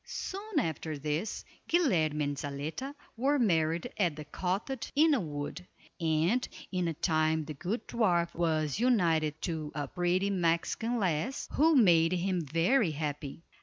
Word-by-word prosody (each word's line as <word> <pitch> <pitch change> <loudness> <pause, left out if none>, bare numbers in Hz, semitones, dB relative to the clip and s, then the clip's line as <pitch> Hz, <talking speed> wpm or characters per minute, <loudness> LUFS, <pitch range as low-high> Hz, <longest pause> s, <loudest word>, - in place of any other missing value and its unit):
Soon 400 -1 -5
after 160 - -3
this, 150 +8 -3 0.2
Guilerme 165 - +2
and 145 0 -1
Zaletta 150 - -5 0.2
were 275 +5 +2
married 170 - +1
at 175 -7 +1
the 150 0 -8
cottage 190 - -3
in 315 +3 +5
the 280 - +3
wood, 155 +1 -5 0.3
and 165 +9 +1 0.2
in 180 -3 0
time 155 -2 +2
the 155 - -6
good 195 - -4
dwarf 175 -7 +1
was 160 -1 0
united 165 - +2
to 155 -4 -3
a 145 -2 -2
pretty 180 +4 0
Mexican 180 +6 0
lass, 190 - -1
who 320 +2 +4
made 175 -8 +5
him 180 0 0
very 165 - +2
happy. 145 0 -4
170 Hz, 140 wpm, -30 LUFS, 155-225 Hz, 0.3 s, in